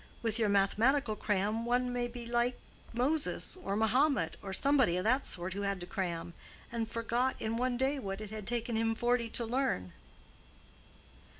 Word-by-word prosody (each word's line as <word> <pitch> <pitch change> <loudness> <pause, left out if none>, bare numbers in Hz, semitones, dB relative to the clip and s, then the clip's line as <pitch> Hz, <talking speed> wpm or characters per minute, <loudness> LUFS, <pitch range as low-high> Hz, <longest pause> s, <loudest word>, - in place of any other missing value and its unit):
With 225 0 0
your 215 -2 +3
mathematical 215 +5 +3
cram 210 +2 0
one 245 +1 +1
may 245 0 0
be 240 0 -8
like 240 +1 0 0.3
Moses 280 +10 0
or 195 - -1
Mohammed 255 +7 +2
or 195 - -6
somebody 255 -5 +3
of 180 - -1
that 255 +5 +2
sort 175 0 -3
who 200 - -3
had 200 -1 -1
to - - -4
cram, 175 -3 -3 0.4
and 230 -1 -2
forgot 235 +3 0
in 220 +1 -1
one 245 +1 0
day 270 +3 +1
what 195 -4 -4
it 215 -1 -7
had 215 -2 -6
taken 235 -1 -1
him 225 0 +1
forty 240 0 +1
to 235 - -2
learn." 225 - -1
230 Hz, 175 wpm, -32 LUFS, 200-245 Hz, 0.4 s, your